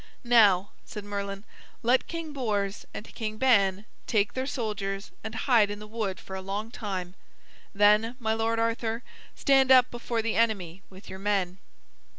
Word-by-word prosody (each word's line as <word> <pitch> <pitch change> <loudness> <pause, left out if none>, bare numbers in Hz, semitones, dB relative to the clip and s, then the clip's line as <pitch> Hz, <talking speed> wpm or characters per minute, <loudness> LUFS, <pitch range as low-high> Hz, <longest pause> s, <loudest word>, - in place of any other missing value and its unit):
"Now," 205 -6 +5
said 210 -2 -8
Merlin, 200 -1 -4 0.4
"let 245 +3 +3
King 330 -2 -5
Bors 210 -6 -2
and 215 - -9
King 215 -1 -4
Ban 205 -6 +3 0.2
take 205 -3 +1
their 260 0 -2
soldiers 210 -6 -3
and 220 +1 -6
hide 225 -4 +3
in 205 - -4
the 210 - -9
wood 210 -3 -3
for 190 - -8
a 190 - -5
long 205 +4 -4
time. 185 -6 -5 0.6
Then, 210 +3 +4
my 220 -2 0
lord 225 +1 0
Arthur, 230 +1 -1 0.3
stand 270 -2 +4
up 255 -1 +7
before 235 -1 -2
the 230 - -1
enemy 195 -6 0
with 190 +2 -14
your 190 - -8
men." 195 -2 -1
215 Hz, 165 wpm, -27 LUFS, 200-230 Hz, 0.6 s, up